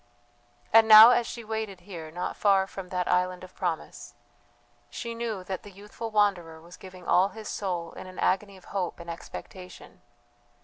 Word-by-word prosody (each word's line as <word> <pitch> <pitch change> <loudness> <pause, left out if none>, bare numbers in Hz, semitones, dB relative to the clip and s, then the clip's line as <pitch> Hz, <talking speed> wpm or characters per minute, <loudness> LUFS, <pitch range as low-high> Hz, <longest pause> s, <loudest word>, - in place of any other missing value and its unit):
And 225 0 +7
now 220 +2 +11
as 240 -1 +2
she 235 - -7
waited 220 -4 -5
here 170 -4 -9
not 175 +3 -4
far 195 -2 +3
from 190 -1 -9
that 180 -1 -2
island 180 0 0
of 185 - -12
promise, 170 -3 -5 0.7
she 235 -1 -6
knew 230 -5 -4
that 185 0 -5
the 205 - -12
youthful 210 +3 -8
wanderer 190 -7 0
was 170 +2 -14
giving 185 -1 -13
all 185 +2 +4
his 220 0 -10
soul 175 -4 -4
in - - -10
an 185 - -12
agony 195 +1 0
of 185 - -18
hope 185 -4 -3
and 170 0 -7
expectation. 180 +2 -11
190 Hz, 175 wpm, -27 LUFS, 180-210 Hz, 0.7 s, now